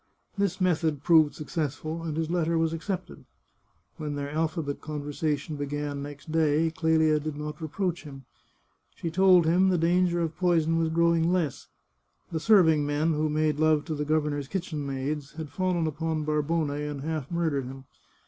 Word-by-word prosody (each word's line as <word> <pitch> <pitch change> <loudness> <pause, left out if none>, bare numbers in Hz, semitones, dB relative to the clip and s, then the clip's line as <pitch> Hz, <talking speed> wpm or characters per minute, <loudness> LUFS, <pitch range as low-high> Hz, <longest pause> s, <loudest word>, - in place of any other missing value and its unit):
This 200 -2 -1
method 160 -5 +1
proved 160 -3 +5
successful, 155 +1 -4
and 160 -2 -4
his 160 -1 0
letter 170 -1 +1
was 165 0 +1
accepted. 180 +2 -5 0.7
When 150 -3 -4
their 145 0 -4
alphabet 155 -2 -2
conversation 150 0 -3
began 145 0 -3
next 145 +2 -8
day 160 0 +2
Clelia 160 -2 +2
did 150 0 -5
not 150 +1 -6
reproach 175 +2 -2
him. 135 -3 -11 0.7
She 165 - -4
told 185 -1 +5
him 180 +4 +4
the 180 - +2
danger 175 +1 +2
of 165 -1 -2
poison 165 -3 +2
was 165 -1 +1
growing 170 +1 +2
less; 170 -7 -1 0.6
the 160 - -1
serving 160 -6 +5
men 145 +3 +1
who 155 +1 0
made 155 -1 0
love 155 -1 +3
to 160 - -3
the 150 -1 -2
governor's 150 -2 0
kitchen 160 -5 -4
maids 140 +2 -3
had 155 -2 -6
fallen 175 +2 0
upon 155 0 -2
Barbone 150 0 0
and 145 -1 -4
half 155 -2 -3
murdered 160 -6 -1
him. 135 +1 -9
155 Hz, 165 wpm, -27 LUFS, 150-165 Hz, 0.7 s, proved